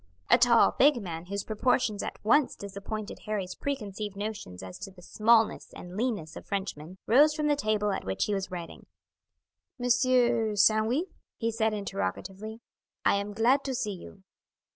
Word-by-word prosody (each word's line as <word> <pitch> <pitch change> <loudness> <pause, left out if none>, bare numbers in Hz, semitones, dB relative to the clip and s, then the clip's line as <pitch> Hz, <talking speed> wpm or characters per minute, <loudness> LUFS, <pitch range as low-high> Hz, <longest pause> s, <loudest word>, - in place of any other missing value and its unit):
A - - +8
tall, 235 -1 +5
big 280 -2 +5
man, 170 -4 -6
whose 200 +1 -3
proportions 215 -1 0
at - - -5
once 275 +5 +3
disappointed 200 +2 -6
Harry's 195 -4 -2
preconceived 210 -7 -4
notions 200 - -6
as 95 -1 -9
to - - -7
the 185 -2 -16
smallness 225 +3 +2
and 180 +1 -10
leanness 210 -8 -2
of - - -8
Frenchmen, 190 -4 -4
rose 295 +6 +5
from 305 -1 -1
the 295 -1 +3
table 215 -5 0
at 195 - -3
which 95 0 -1
he 210 - -1
was 195 -1 -2
writing. 175 -2 -8 0.9
"Monsieur 245 -3 +2
Sandwith?" 220 - +2 0.2
he 230 -1 -1
said 220 -1 0
interrogatively. 200 - -4 0.4
"I - - +4
am 200 +1 -4
glad 245 +6 +3
to 265 -2 -2
see 235 -5 -2
you." 190 +1 -12
215 Hz, 165 wpm, -28 LUFS, 195-240 Hz, 0.9 s, A